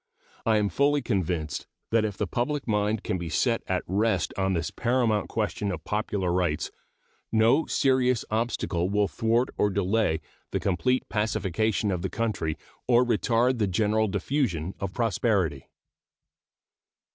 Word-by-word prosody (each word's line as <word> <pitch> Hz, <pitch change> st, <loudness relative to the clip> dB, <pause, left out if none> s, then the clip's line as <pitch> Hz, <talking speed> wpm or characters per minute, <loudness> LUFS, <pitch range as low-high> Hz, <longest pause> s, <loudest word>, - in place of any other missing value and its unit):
I 110 Hz, -1 st, +4 dB
am 105 Hz, -1 st, +1 dB
fully 145 Hz, +2 st, +2 dB
convinced 90 Hz, -, -2 dB, 0.2 s
that 115 Hz, -1 st, +3 dB
if 105 Hz, -3 st, -4 dB
the 105 Hz, -, 0 dB
public 125 Hz, +8 st, -2 dB
mind 105 Hz, 0 st, 0 dB
can 100 Hz, -5 st, -2 dB
be 85 Hz, -1 st, -4 dB
set -, -, +1 dB
at -, -, 0 dB
rest 100 Hz, -1 st, +1 dB
on 95 Hz, 0 st, +1 dB
this 85 Hz, -1 st, -2 dB
paramount 120 Hz, -3 st, +1 dB
question 105 Hz, -2 st, -1 dB
of 80 Hz, -4 st, -5 dB
popular 100 Hz, -3 st, -1 dB
rights 85 Hz, -4 st, 0 dB, 0.6 s
no 115 Hz, +8 st, +4 dB
serious 130 Hz, -3 st, +2 dB
obstacle 110 Hz, -6 st, 0 dB
will 105 Hz, 0 st, +2 dB
thwart 115 Hz, +5 st, +1 dB
or 105 Hz, -, +4 dB
delay 100 Hz, -3 st, +1 dB, 0.3 s
the -, -, -1 dB
complete 125 Hz, +7 st, 0 dB
pacification 105 Hz, -1 st, 0 dB
of 90 Hz, -2 st, -2 dB
the 95 Hz, -, -2 dB
country 105 Hz, -9 st, -2 dB, 0.3 s
or 125 Hz, 0 st, +5 dB
retard 120 Hz, +2 st, +2 dB
the 105 Hz, -, +2 dB
general 110 Hz, +3 st, +2 dB
diffusion 95 Hz, -, -1 dB
of 100 Hz, -2 st, -3 dB
prosperity. 100 Hz, -, 0 dB
105 Hz, 145 wpm, -27 LUFS, 95-115 Hz, 0.6 s, or